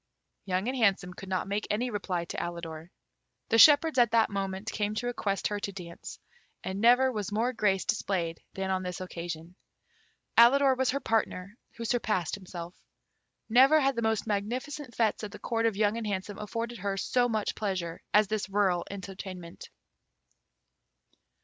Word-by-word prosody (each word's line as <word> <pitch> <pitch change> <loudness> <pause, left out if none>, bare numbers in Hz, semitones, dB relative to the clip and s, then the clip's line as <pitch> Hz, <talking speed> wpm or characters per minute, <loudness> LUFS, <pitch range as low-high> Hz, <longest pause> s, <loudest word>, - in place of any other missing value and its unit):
Young 190 +2 -1
and 260 - -1
Handsome 195 -6 +2
could 190 +1 -10
not 185 0 -1
make 205 +2 -2
any 240 +4 -1
reply 185 -5 -2
to - - -7
Alidor. 170 -1 -5 0.6
The 225 - +4
shepherds 295 +1 +7
at 240 -2 +5
that 225 -1 +3
moment 195 +1 -3
came 210 0 -2
to 245 - -2
request 205 -5 -2
her 205 -1 -2
to 200 - -4
dance, 175 -3 -9 0.5
and 190 +2 -4
never 250 +3 +5
was 210 -4 -4
more 230 +4 0
grace 205 -5 +1
displayed 175 -6 -1
than 190 0 -2
on 185 0 0
this 180 -1 -5
occasion. 170 -2 -6 0.9
Alidor 265 +3 +6
was 260 0 +1
her 280 - 0
partner, 210 -5 -1 0.2
who 230 - -6
surpassed 215 -7 0
himself. 180 -3 -7 0.7
Never 265 +7 +6
had 275 -2 +2
the 235 - -1
most 220 -1 0
magnificent 245 +6 -3
fêtes 225 -1 +1
at 210 - -5
the 210 - -9
Court 230 -1 0
of 215 -3 -1
Young 210 +1 +2
and 225 -2 -3
Handsome 200 0 -4
afforded 230 +2 -4
her 195 +1 -2
so 245 +4 +1
much 215 -2 -1
pleasure 185 -5 -3
as 210 0 +5
this 215 -1 -2
rural 195 -3 +2
entertainment. 190 -3 -8
205 Hz, 170 wpm, -29 LUFS, 185-230 Hz, 0.9 s, shepherds